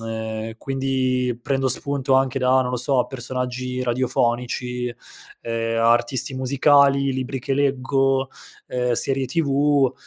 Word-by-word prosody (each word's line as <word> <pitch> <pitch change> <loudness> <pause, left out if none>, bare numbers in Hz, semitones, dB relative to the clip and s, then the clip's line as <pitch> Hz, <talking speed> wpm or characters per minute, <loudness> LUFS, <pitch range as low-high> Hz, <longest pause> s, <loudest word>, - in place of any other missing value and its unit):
ehm, 110 0 -4
quindi, 130 -2 -1
prendo 135 0 0
spunto 135 +1 0
anche 135 0 +2
da, 130 0 +3
non 125 - -3
lo 125 - -1
so, 125 0 +2
personaggi 125 0 -4
radiofonici, 125 0 -1 0.5
ehm, 115 0 -2
a 115 - +5
artisti 120 +3 0
musicali, 140 +1 +3
libri 130 +1 -3
che 130 +2 -3
leggo, 135 -1 +1 0.4
ehm, 125 -1 -1
serie 135 +3 +1
TV, 140 -2 +2
130 Hz, 125 wpm, -22 LUFS, 125-135 Hz, 0.5 s, a